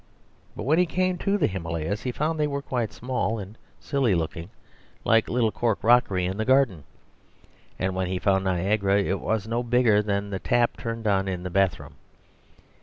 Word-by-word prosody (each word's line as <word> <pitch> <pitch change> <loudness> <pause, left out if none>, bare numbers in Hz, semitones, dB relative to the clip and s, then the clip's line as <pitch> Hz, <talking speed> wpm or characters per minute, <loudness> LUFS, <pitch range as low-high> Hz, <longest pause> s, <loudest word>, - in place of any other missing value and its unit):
But - - -5
when 155 +7 +3
he 180 - +3
came 185 +1 0
to 200 0 +1
the - - +2
Himalayas, 85 +2 -3
he 125 - -2
found 155 +5 -2
they 150 - +2
were 140 -1 -3
quite 120 -6 -2
small 120 -1 -2
and 100 +1 -8 0.2
silly 135 -9 +1
looking, 85 +1 -3 0.6
like 115 -1 +4
the - - -6
little 115 -3 +2
cork 110 0 -1
rockery 110 -6 +3
in 95 +2 -3
the 110 - 0
garden; 120 - +2 0.9
and 95 0 -1
when 95 0 -1
he 90 +1 -2
found 95 0 +1
Niagara 100 +2 +1
it 95 0 -1
was 110 -2 -1
no 115 +2 -1
bigger 120 -3 +3
than 100 -1 -2
the 95 - -3
tap 120 +3 +1
turned 115 -1 -5
on 95 -2 +2
in 90 -2 -3
the 90 - -5
bathroom. 95 0 0
105 Hz, 190 wpm, -25 LUFS, 95-125 Hz, 0.9 s, like